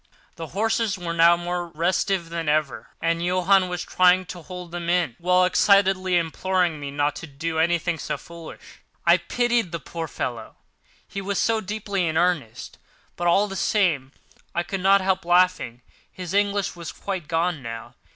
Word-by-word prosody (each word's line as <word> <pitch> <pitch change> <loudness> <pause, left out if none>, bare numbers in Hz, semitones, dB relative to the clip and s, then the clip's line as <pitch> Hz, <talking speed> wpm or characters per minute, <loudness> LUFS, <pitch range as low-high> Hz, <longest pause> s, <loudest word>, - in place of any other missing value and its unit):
The 165 - -7
horses 220 +3 0
were 175 -2 -4
now 170 +1 +5
more 175 0 -3
restive 170 +2 -1
than 165 -2 -3
ever, 140 -7 -1
and 165 +1 +1
Johann 185 +1 +3
was 180 -1 -3
trying 185 0 +3
to 175 - -10
hold 180 +1 -9
them 170 -1 -4
in, 175 -9 +1
while 180 +1 +3
excitedly 185 -1 +3
imploring 175 0 0
me 145 -1 -5
not 145 +1 0
to 165 - -8
do 160 +3 -3
anything 170 0 +1
so - - -3
foolish. 170 -1 -12 0.2
I - - +6
pitied 240 -6 0
the 170 - -3
poor 165 +3 -6
fellow, 115 -6 -5 0.5
he 195 - -5
was 195 0 0 0.2
deeply 200 -3 -2
in 160 0 -1
earnest; 165 -11 -1 0.4
but 175 - -2
all 200 +4 +4
the 195 - -7
same 170 -11 +1 0.4
I 175 - +1
could 195 +1 -4
not 195 +1 +5
help 190 0 0
laughing. 175 -9 +2 0.3
His 180 -1 -7
English 205 -1 +1
was 170 -2 -7
quite 185 -6 -5
gone 165 -2 0
now. 115 -2 -7
175 Hz, 170 wpm, -24 LUFS, 165-185 Hz, 0.5 s, I